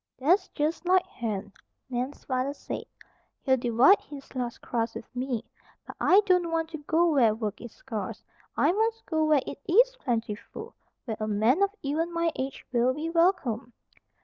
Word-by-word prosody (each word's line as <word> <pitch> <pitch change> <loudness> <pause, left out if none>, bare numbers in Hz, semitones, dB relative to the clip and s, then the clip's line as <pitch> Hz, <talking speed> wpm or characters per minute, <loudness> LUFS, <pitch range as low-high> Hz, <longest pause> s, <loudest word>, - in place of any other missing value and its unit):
"That's 340 +10 +3
just 320 +4 -2
like 370 0 +4
Hen," 205 -4 -5 0.3
Nan's 255 +2 -4
father 260 +2 -1
said. - - -6 0.6
"He'd 260 -1 +3
divide 245 - +5
his 280 -2 -11
last 245 -3 -3
crust 230 -2 -2
with 230 +2 -9
me. 250 -2 -2 0.4
But - - -9
I 390 +3 +6
don't 360 -3 +3
want 325 0 -1
to 315 - -5
go 325 +3 +2
where 235 -7 +4
work 215 -2 -4
is 240 - -8
scarce. 225 -6 -6 0.3
I - - +4
must 450 +3 0
go 315 -2 +1
where 300 -3 +3
it 280 - -7
is - - +5
plentiful, 235 - -4 0.3
where 220 -4 -4
a 215 - -2
man 220 - +2
of 400 - +4
even 315 +5 -1
my 335 0 0
age 265 +1 -5
will 250 +1 +2
be 320 +2 -3
welcome." 330 - +1
275 Hz, 175 wpm, -27 LUFS, 235-335 Hz, 0.6 s, I